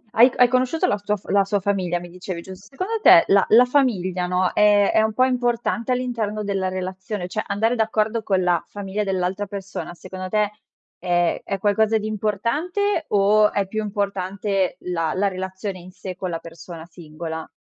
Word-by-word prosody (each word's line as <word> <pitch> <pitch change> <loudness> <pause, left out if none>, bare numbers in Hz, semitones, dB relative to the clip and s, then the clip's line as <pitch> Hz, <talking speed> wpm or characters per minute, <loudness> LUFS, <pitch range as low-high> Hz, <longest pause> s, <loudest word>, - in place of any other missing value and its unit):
Hai 240 +3 +7
c - - -14
hai 250 - +6
conosciuto 255 +5 +1
la 205 - +1
sua 210 0 0
f 190 - -25
la 200 0 +4
sua 200 +1 0
famiglia 185 -3 -1
mi 175 0 -10
dicevi, 180 0 -7
giust 190 +2 -12
secondo 375 +11 -3
te 170 - +8
la 195 -1 +5
la 240 +3 +7
famiglia, 190 -10 +1
no, 180 0 +1
è 205 -1 +4
è - - +4
un 220 0 0
po' 255 - +3
importante 240 -1 -1
all'interno 230 -4 -2
della 195 -2 -1
relazione? 185 +1 -5
Cioè 215 +4 -3
andare 220 +4 +1
d'accordo 220 0 0
con 190 -3 +1
la 175 -2 +1
famiglia 205 +1 -4
dell'altra 190 +1 -1
persona 195 -2 -6
secondo 185 +1 -8
te 210 0 +1 0.5
è 175 -1 +1
è 195 - -3
qualcosa 215 +3 +2
di 215 0 -4
importante 290 - -1
o 210 +1 +4
è 200 -1 -1
più 215 +3 -3
importante 200 -1 -2
la 165 -3 -2
la 200 +2 +1
relazione 190 +1 -5
in 180 +1 -12
sé 185 0 -8
con 185 -1 -4
la 165 - -3
persona 165 0 -10
singola? 160 -1 -7
200 Hz, 185 wpm, -22 LUFS, 185-220 Hz, 0.5 s, te